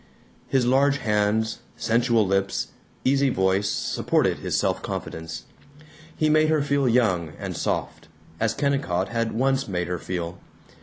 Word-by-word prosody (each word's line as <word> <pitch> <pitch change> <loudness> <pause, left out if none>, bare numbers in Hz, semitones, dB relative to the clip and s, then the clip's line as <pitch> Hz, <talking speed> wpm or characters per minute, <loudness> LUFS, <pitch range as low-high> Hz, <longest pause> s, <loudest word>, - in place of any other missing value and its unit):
His 130 -2 +2
large 135 +3 +3
hands, 110 -1 0 0.2
sensual 115 -1 +2
lips, 95 0 0 0.4
easy 135 +1 +3
voice 95 -2 +1
supported - - 0
his - - -1
self - - 0
confidence. 80 0 -5 0.7
He 155 - +2
made 155 0 +4
her 155 -2 +2
feel 140 -2 +2
young 95 -10 +2
and - - -5
soft - - -3 0.3
as 115 0 +1
Kennicott 140 -11 0
had 115 -1 -1
once 135 +3 +1
made 90 -3 -2
her 90 -1 -3
feel. 90 0 -4
115 Hz, 140 wpm, -24 LUFS, 95-135 Hz, 0.7 s, made